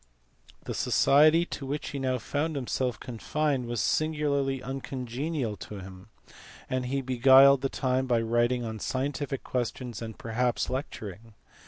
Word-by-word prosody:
The - - -4
society 155 +4 +4
to 140 - -6
which 145 +2 -3
he 140 - -4
now 130 -1 0
found 150 +5 -2
himself 125 -2 -2
confined 135 +2 -2
was 120 -1 -2
singularly 140 -1 0
uncongenial 135 -1 -3
to 105 - -8
him, 95 +1 -10 0.6
and 130 -1 -2
he 135 +2 -1
beguiled 130 +1 +6
the 135 - 0
time 130 0 0
by 120 -2 +3
writing 120 +2 +1
on 110 -1 -5
scientific 135 +3 -2
questions 125 -2 -3
and 110 -1 -7
perhaps 120 +2 -1
lecturing. 115 - -6
130 Hz, 140 wpm, -28 LUFS, 120-140 Hz, 0.6 s, beguiled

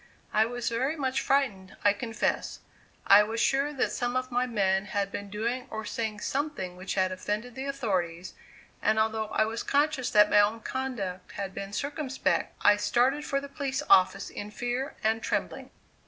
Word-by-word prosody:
I 220 +1 +4
was 245 0 -4
very 260 +6 0
much 265 -3 -1
frightened, 210 -10 0
I 205 - +5
confess; 225 0 -2 0.5
I 200 +1 +8
was 220 +2 -2
sure 275 +4 +2
that 270 - 0
some 245 0 -2
of 255 0 -1
my 245 +1 +1
men 195 -4 +1
had 200 -1 -2
been 200 0 -5
doing 235 +5 -2
or 220 0 -5
saying 215 -2 -3
something 275 -11 -2
which 185 +1 -5
had 185 -1 +2
offended 210 +6 -3
the 265 +3 -5
authorities, 185 -10 -2 0.5
and 220 - +2
although 220 0 +1
I 215 0 +1
was 225 +1 -3
conscious 285 -3 +1
that 210 0 +5
my 205 - +6
own 215 +2 +2
conduct 215 -10 -4
had 195 -1 -5
been 195 +1 -6
circumspect, 280 +3 -1
I 205 0 +7
started 260 +7 +2
for 275 - 0
the 280 - -8
police 280 0 -3
office 190 +1 +5
in 205 - -6
fear 245 +6 -3
and 220 +1 +1
trembling. - - -2
225 Hz, 180 wpm, -28 LUFS, 205-265 Hz, 0.5 s, I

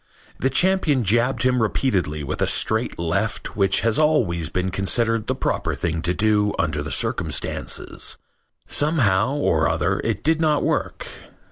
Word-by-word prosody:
The 135 - +1
champion 160 -4 +2
jabbed 120 +7 +1
him 125 -1 +2
repeatedly 95 - -1
with 70 - -4
a - - +2
straight 110 +2 +1
left 100 +6 -2
which 95 -2 +2
has 115 +4 +1
always 100 - +1
been 90 +1 -2
considered 115 +4 0
the - - -1
proper - - -2
thing 80 -1 -2
to 85 +2 0
do 105 -1 +2
under 75 -2 -1
the 75 - -5
circumstances. - - -1 0.5
Somehow 135 - +1
or 80 - +1
other - - 0
it - - -3
did 160 +1 +2
not 150 -2 +2
work. - - -2
110 Hz, 150 wpm, -22 LUFS, 90-135 Hz, 0.5 s, champion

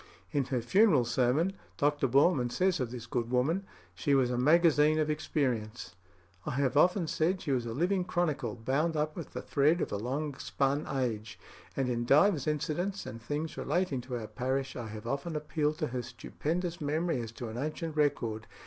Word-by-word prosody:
In 140 -2 +1
her 125 -2 -1
funeral 165 - +4
sermon, 130 +9 +1 0.2
Dr. 145 -1 +2
Boreman 135 0 +3
says 185 +1 +1
of 125 -3 -1
this 120 -1 -7
good 115 0 -2
woman: 155 +10 +1 0.3
"She 145 -3 +1
was 130 -2 +3
a - - 0
magazine 155 +1 +5
of 155 -1 +1
experience.... 120 - -2 0.5
I - - -3
have 140 -1 +1
often 180 +4 +4
said 165 +4 0
she 150 - -3
was 125 -3 0
a 115 - -4
living 180 +5 +1
chronicle 150 - -1
bound 145 +8 0
up 155 +1 -1
with 170 - -7
the - - -5
thread 150 +4 +3
of - - -2
a 100 - -1
long 140 +7 -2
spun 140 +2 0
age. 115 -6 -2 0.4
And 135 -2 +1
in 120 -1 -1
divers 150 +3 +4
incidents 165 +6 -1
and 115 +1 -7
things 150 +6 -4
relating 175 -8 0
to 125 0 -5
our 115 - -5
parish, 130 +4 -2
I 120 -3 -5
have 110 0 -8
often 140 +6 -3
appealed 150 0 -1
to 155 -2 -1
her 125 0 -2
stupendous 165 +8 -4
memory 155 -1 0
as 115 -1 -6
to 120 -1 -6
an 110 - -6
ancient 155 +2 -3
record.... 115 -8 0
140 Hz, 190 wpm, -31 LUFS, 125-160 Hz, 0.5 s, magazine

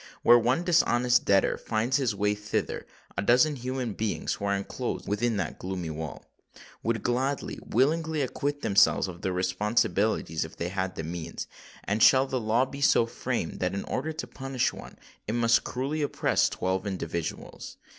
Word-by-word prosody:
Where 120 0 +8
one 125 +8 +1
dishonest 125 -8 +3
debtor 100 -1 +3
finds 115 +3 0
his 125 -7 0
way 105 +1 +1
thither, 105 0 -3 0.3
a - - -1
dozen 125 +8 +4
human 125 -2 -3
beings 110 +1 -2
who 100 - -5
are 100 0 +1
enclosed 100 0 -4
within 110 +2 0
that 95 -5 -3
gloomy 90 -3 -4
wall, 80 -1 -6 0.6
would 115 -1 -1
gladly—willingly, 140 +4 0
acquit 145 +3 -3
themselves 100 -1 +4
of 85 -2 -9
their 95 - -1
responsibilities 90 -1 0
if 80 - -10
they 85 - -2
had 95 -1 -3
the 80 - -4
means. 85 0 -5 0.4
And 105 +3 -1
shall 130 0 +7
the 130 -2 -2
law 115 +4 +2
be 140 +1 -9
so 130 -4 +5
framed 115 - -3
that, - - -1
in 100 - -3
order 150 +5 -3
to 155 - -5
punish 135 -2 -2
one, - - -11 0.3
it 110 - -1
must 115 -1 +3
cruelly 140 +5 -2
oppress 145 - +1
twelve 95 +1 -2
individuals? 85 -4 -5
110 Hz, 165 wpm, -28 LUFS, 95-130 Hz, 0.6 s, Where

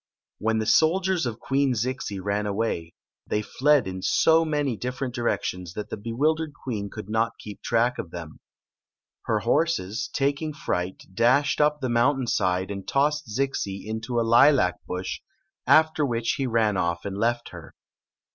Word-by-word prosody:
When 110 +1 +1
the 110 - -1
soldiers 175 - +3
of 115 -1 -5
Queen 135 -1 +1
Zixi 115 -3 -3
ran 100 +2 -1
away, 100 -5 -2 0.3
they 105 - -1
fled 145 +1 +2
in 95 0 -5
so 160 - +4
many 145 -5 -1
different 125 +2 -4
directions 90 -7 -2
that 105 - -6
the - - -2
bewil 115 +9 0
dered 160 -2 -5
queen 110 -7 -5
could 95 - -8
not 115 +2 0
k. 105 - -8
ep 100 - -13
track 120 +1 +1
of 85 - -5
them. 80 -3 -9 0.9
Her - - 0
horse, 140 - 0
taking 145 +3 -1
fright, 90 -10 -3
dashed 130 +9 +3
up 150 0 +2
the 130 - -1
mountain 125 +3 +2
side 95 -3 0
and 100 -1 -6
tossed 150 +1 +1
Zixi 105 -5 -2
into 110 +3 -4
a - - +2
hlac 120 -4 +5
bush, 90 +1 -4 0.5
after 160 -1 +4
which 115 -4 0
he 135 -2 -1
ran 110 -4 +2
off 85 -1 -1
and 100 -1 -4
left 120 +2 0
her. - - -12
120 Hz, 165 wpm, -25 LUFS, 100-140 Hz, 0.9 s, hlac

